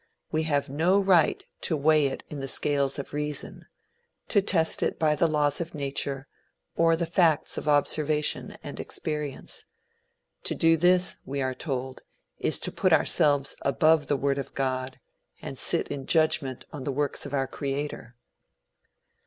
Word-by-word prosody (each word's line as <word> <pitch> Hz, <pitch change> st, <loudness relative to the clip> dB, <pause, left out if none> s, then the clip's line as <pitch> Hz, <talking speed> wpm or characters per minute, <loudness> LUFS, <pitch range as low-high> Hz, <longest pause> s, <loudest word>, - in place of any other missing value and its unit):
We 155 Hz, 0 st, 0 dB
have 145 Hz, -2 st, +1 dB
no 165 Hz, +8 st, +2 dB
right 190 Hz, -5 st, +3 dB, 0.2 s
to 160 Hz, -, +1 dB
weigh 150 Hz, 0 st, +4 dB
it 135 Hz, -, -5 dB
in 150 Hz, -, -7 dB
the 135 Hz, -, -4 dB
scales 140 Hz, 0 st, 0 dB
of 140 Hz, -, -7 dB
reason 150 Hz, 0 st, -5 dB, 0.6 s
to 205 Hz, -, +4 dB
test 165 Hz, -4 st, +1 dB
it -, -, 0 dB
by 155 Hz, -1 st, +2 dB
the 160 Hz, +3 st, +2 dB
laws 150 Hz, -1 st, +2 dB
of 170 Hz, -1 st, -6 dB
nature, 140 Hz, -1 st, -3 dB, 0.5 s
or 165 Hz, 0 st, +4 dB
the 170 Hz, +1 st, -1 dB
facts 165 Hz, -2 st, +2 dB
of -, -, -5 dB
observation 150 Hz, +1 st, +1 dB
and -, -, -7 dB
experience. 150 Hz, -3 st, -4 dB, 0.8 s
To -, -, 0 dB
do 165 Hz, 0 st, +4 dB
this, 180 Hz, +2 st, +3 dB
we 140 Hz, +1 st, -4 dB
are 130 Hz, 0 st, -1 dB
told, 130 Hz, -2 st, -4 dB, 0.4 s
is -, -, +1 dB
to -, -, 0 dB
put -, -, +1 dB
ourselves 145 Hz, -2 st, +2 dB
above 150 Hz, +3 st, +3 dB
the 145 Hz, -, +1 dB
word 140 Hz, +1 st, 0 dB
of 140 Hz, -, -7 dB
God, 130 Hz, -1 st, -2 dB, 0.4 s
and -, -, -7 dB
sit -, -, +3 dB
in 135 Hz, -2 st, -5 dB
judgment 155 Hz, -5 st, +1 dB
on 145 Hz, -4 st, -6 dB
the 140 Hz, -, -2 dB
works 145 Hz, +1 st, -2 dB
of 140 Hz, -, -10 dB
our 135 Hz, -1 st, +1 dB
creator. 140 Hz, -3 st, -5 dB
145 Hz, 160 wpm, -27 LUFS, 140-160 Hz, 0.8 s, weigh